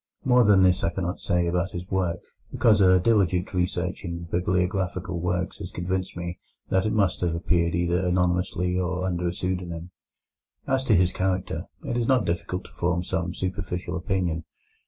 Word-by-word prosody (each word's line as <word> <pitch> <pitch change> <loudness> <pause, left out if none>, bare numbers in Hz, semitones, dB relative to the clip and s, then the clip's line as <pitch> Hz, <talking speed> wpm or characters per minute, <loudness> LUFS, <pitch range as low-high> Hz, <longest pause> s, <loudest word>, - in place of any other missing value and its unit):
More 125 -1 +5
than 100 -3 +6
this 90 0 +3
I 85 - +3
cannot 90 +1 -3
say 90 0 +1
about 90 +2 0
his 90 0 -5
work, 90 -3 0 0.3
because 105 -3 +4
a 95 -1 +6
diligent 95 -3 +2 0.2
search 90 +2 -3
in 85 -1 -5
bibliographical 90 0 0
works 90 +1 -2
has - - -6
convinced 90 +1 -3
me 85 0 -5 0.3
that 95 +2 +2
it - - 0
must 100 -4 +1
have 85 -2 0
appeared 85 0 +1
either 85 +1 +1
anonymously 90 0 +1
or 90 0 -1
under 90 -1 -1
a - - 0
pseudonym. 90 -1 -4 0.7
As 135 0 +1
to 110 - +4
his 90 0 +4
character, 95 0 -1 0.2
it 120 - -1
is 120 -1 0
not 130 -5 +3
difficult 85 +2 -2
to - - -15
form 90 0 0
some 90 -1 -2
superficial 90 -1 -3
opinion. 90 -3 -1
90 Hz, 175 wpm, -26 LUFS, 85-95 Hz, 0.7 s, than